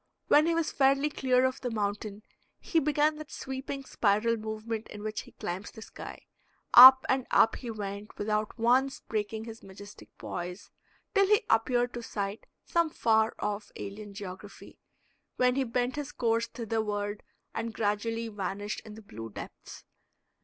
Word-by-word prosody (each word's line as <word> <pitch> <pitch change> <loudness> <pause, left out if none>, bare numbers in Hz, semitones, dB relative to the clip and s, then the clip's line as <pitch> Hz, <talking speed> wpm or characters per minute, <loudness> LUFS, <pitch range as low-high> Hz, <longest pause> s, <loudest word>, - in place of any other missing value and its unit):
When 300 +2 +6
he 335 - +2
was 330 -1 0
fairly 275 +2 +3
clear 255 -2 +2
of 260 +1 -1
the 250 - -2
mountain 210 -1 -3 0.4
he 330 - +1
began 300 +1 +2
that 310 -1 -9
sweeping 265 +1 -5
spiral 215 +1 +2
movement 220 0 -5
in 210 0 -9
which 215 0 -3
he - - -16
climbs 180 +3 -5
the 220 - -11
sky. - - -10 0.5
Up 260 +2 +11
and 260 -1 +1
up - - +4
he 245 - -7
went 205 -1 -6
without 210 +1 -1
once 255 +4 +2
breaking 220 0 -3
his 225 0 -9
majestic 200 +1 -12
poise 180 +2 -6 0.4
till 395 -2 +4
he 420 +1 +3
appeared 245 +2 +2
to 240 - -5
sight 205 -1 -4 0.2
some 335 -1 +1
far 220 -5 +2
off 205 0 -3
alien 200 0 -8
geography, 200 +1 -9 0.6
when 250 0 +3
he 270 +1 +1
bent 250 +2 -1
his 290 -3 -4
course 230 -1 0
thitherward 210 -3 -3 0.3
and 230 0 -3
gradually 225 +2 -1
vanished 205 0 -4
in 215 -1 -10
the 220 - -12
blue 115 - -8
depths. - - -10
225 Hz, 160 wpm, -29 LUFS, 205-260 Hz, 0.6 s, Up